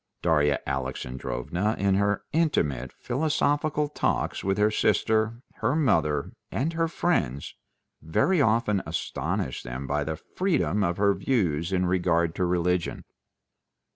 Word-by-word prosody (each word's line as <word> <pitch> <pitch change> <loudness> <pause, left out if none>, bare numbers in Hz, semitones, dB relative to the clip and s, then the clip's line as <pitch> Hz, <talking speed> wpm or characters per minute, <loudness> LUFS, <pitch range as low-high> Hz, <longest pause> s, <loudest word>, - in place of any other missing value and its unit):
Darya 75 -4 +3
Alexandrovna 65 - -2
in 100 0 +2
her 100 +1 +1
intimate, 75 - +1
philosophical 145 +2 0
talks 145 - -1
with 95 +1 0
her 105 +1 +3
sister, 110 +2 +1
her 120 +6 +1
mother, 75 - +1 0.2
and 150 +7 -1
her 165 0 +1
friends 160 - -1 0.5
very 140 - +2
often 110 -5 +2
astonished 65 - -3
them 65 +3 -5
by 75 +2 0
the 80 +2 -3
freedom 150 - 0
of 85 -1 0
her 100 0 +4
views 95 - 0
in 90 -1 +1
regard 85 -2 +1
to 90 - 0
religion. 90 0 0
95 Hz, 125 wpm, -26 LUFS, 80-125 Hz, 0.5 s, her